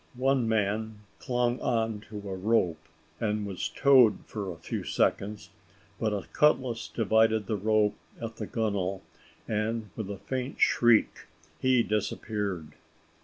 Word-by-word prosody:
One 130 -2 +2
man 110 0 -1 0.2
clung 120 0 0
on 115 -3 0
to 105 - -7
a 95 - -3
rope, 95 -5 +1 0.4
and 105 -1 -1
was 95 -3 -3
towed 130 -6 +5
for 100 -3 -5
a 85 - -9
few - - -4
seconds, 100 -1 -1 0.5
but 110 -2 0
a 100 -2 -3
cutlass 130 -6 +2
divided 110 -1 +2
the 110 - -1
rope 105 +1 +2 0.3
at 115 -1 -6
the 105 - -5
gunwale, 100 -4 -1 0.4
and 110 -1 -2
with 110 -3 -5
a 100 - -5
faint 125 +7 -4
shriek 120 -2 +3 0.3
he 130 -2 +3
disappeared. 105 -5 -2
110 Hz, 135 wpm, -28 LUFS, 100-115 Hz, 0.5 s, towed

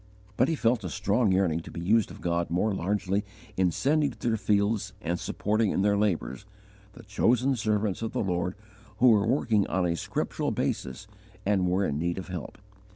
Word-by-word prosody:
But 125 - +3
he 165 - 0
felt 115 -4 +1
a 90 - -3
strong 100 +5 +1
yearning 95 -4 +2
to 85 - -10
be - - -7
used 105 +5 +2
of - - -11
God 85 0 -1
more 100 +5 +1
largely 100 +2 -1 0.3
in 95 -1 +3
sending 145 - +1
to - - -6
their 110 - +2
fields 105 0 0
and 85 +1 -2
supporting 105 +1 0
in 95 - 0
their 100 0 +3
labours, 100 -3 -1 0.5
the - - -13
chosen 120 +6 +2
servants 105 -3 0
of 115 - -3
the - - -1
Lord 90 -1 -1 0.4
who 125 +3 +6
were 105 -2 +4
working 115 -5 +2
on 95 -1 0
a 85 -1 0
scriptural - - -2
basis 65 0 -3 0.4
and 95 -2 +2
were 95 +2 +1
in 70 0 -1
need 85 +2 -1
of 95 - -6
help. 90 -5 -6
100 Hz, 195 wpm, -27 LUFS, 90-110 Hz, 0.5 s, who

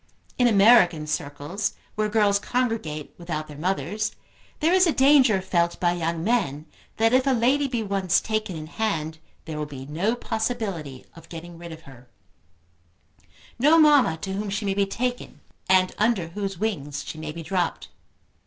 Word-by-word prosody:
In 245 - +5
American 200 -7 +5
circles, 150 +6 -3 0.2
where 215 0 -1
girls 205 -2 +3
congregate 220 - -2
without 155 -3 -4
their 150 - -10
mothers, 195 +6 -2 0.5
there 325 +3 +2
is 370 -1 +5
a - - +3
danger 265 -9 +4
felt 170 -2 0
by 175 -1 +2
young 165 -1 -2
men 155 - 0 0.3
that 225 +2 +3
if 260 +1 +3
a 270 - +4
lady 260 +4 +2
be 240 -4 -2
once 195 -3 +1
taken 215 -4 -3
in 155 -1 -6
hand, 160 -4 -3 0.3
there 155 -2 -5
will 150 - -3
be 135 -2 -9
no 175 - -1
possibility 210 - -4
of 165 -1 -15
getting 170 +1 -9
rid 170 0 -9
of 160 0 -11
her, 130 -4 -15 1.5
no 300 +6 +5
mamma 290 - +5
to 190 - -3
whom 205 +1 -3
she 200 +2 -3
may 195 - 0
be 200 0 +1
taken 245 +4 -4 0.3
and 185 -1 +4
under 210 -6 +1
whose 195 +1 -4
wings 150 -9 -3
she 155 - -7
may 155 -1 -5
be 165 +1 -8
dropped. 180 +2 -2
195 Hz, 170 wpm, -24 LUFS, 160-225 Hz, 1.5 s, In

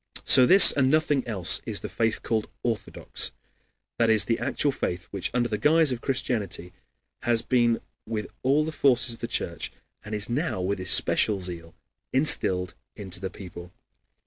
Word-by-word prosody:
So 130 -2 +7
this, 195 +1 +9
and 130 -2 +1
nothing 150 -3 +1
else, 95 -7 0
is - - 0
the - - -5
faith 115 -1 -2
called 110 -2 -2
Orthodox, 115 -3 -4 0.7
that 115 -1 +2
is 110 -2 +5
the 115 0 -1
actual 145 - 0
faith 90 -9 -4
which, 100 -2 -3
under 120 -1 0
the 105 -2 -4
guise 160 -1 +3
of 125 -1 -4
Christianity, 110 -9 -3 0.5
has 115 -1 +2
been 120 -2 +1 0.3
with 105 -2 -4 0.2
all 140 +4 +1
the 160 - -4
forces 130 -5 +1
of 115 - -12
the 115 - -5
Church, 85 -7 -4 0.3
and 105 +1 -6
is 105 -1 -3
now 135 - -2
with 95 +2 -2
especial 95 +2 +2
zeal, 85 -2 -6 0.4
instilled 90 - +3 0.2
into 95 -4 -6
the 95 0 -5
people. 90 -2 -11
115 Hz, 170 wpm, -25 LUFS, 95-130 Hz, 0.7 s, this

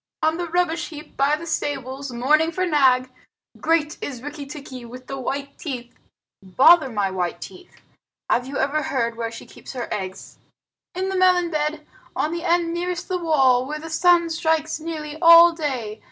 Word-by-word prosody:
"On 315 +1 +2
the 350 -1 -4
rubbish 340 -1 0
heap 305 -2 -11
by 280 +2 +2
the 320 +2 -8
stables, 275 -3 -3
mourning 300 +7 +2
for 370 +2 -1
Nag. 260 -6 +3 0.5
Great 320 -2 0
is 255 -3 -6
Rikki 290 -1 -7
tikki 275 -3 -9
with 250 +2 -11
the 275 - -6
white 280 +2 -5
teeth." 250 -6 -6 0.5
"Bother 265 - +5
my 205 -4 -1
white 180 -2 -3
teeth! 365 -1 -12 0.5
Have 245 +1 +1
you 275 +1 -5
ever 285 +3 0
heard 235 -5 -1
where 230 0 -3
she 230 - -10
keeps - - -12
her 245 -3 -4
eggs?" 190 -2 -7 0.6
"In 375 +1 -2
the 385 - -2
melon 365 -2 +3
bed, 300 0 -2 0.3
on 305 - -1
the 340 0 -4
end 340 -1 +1
nearest 355 +1 -3
the 365 -1 -1
wall, 265 -6 +3
where 300 +2 -4
the 320 +1 -8
sun 340 0 +3
strikes 315 -1 0
nearly 310 -1 -6
all 335 0 +9
day. 255 -9 -4
300 Hz, 180 wpm, -22 LUFS, 255-335 Hz, 0.6 s, all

